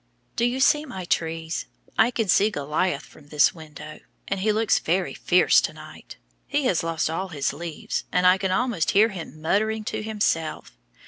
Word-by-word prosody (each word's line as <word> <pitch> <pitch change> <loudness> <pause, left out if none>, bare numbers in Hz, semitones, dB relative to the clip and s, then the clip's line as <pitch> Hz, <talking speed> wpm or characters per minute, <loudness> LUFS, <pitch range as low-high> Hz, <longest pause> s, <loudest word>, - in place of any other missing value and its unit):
Do 235 - +1
you 245 +2 0
see 295 +2 +4
my 190 - -7
trees? 160 -1 -2 0.3
I 220 - +4
can 225 -3 -2
see 200 +3 +4
Goliath 150 -1 -1
from 145 - -18
this 150 0 +3
window; 155 -2 -11 0.4
he 200 +3 +1
looks 215 0 +2
very 180 +3 -1
fierce 180 0 +4
to - - -3
night; - - -12 0.3
he 285 0 0
has 185 -9 +2
lost 165 -1 -1
all 165 +5 -3
his 145 -7 -2
leaves, 160 +1 -5
and 180 0 +2
I 185 +1 +6
can 190 - -1
almost 215 -3 0
hear 220 +2 +6
him 175 -5 -8
muttering 215 +7 0
to - - -4
himself. 205 - -2
180 Hz, 180 wpm, -24 LUFS, 160-215 Hz, 0.4 s, I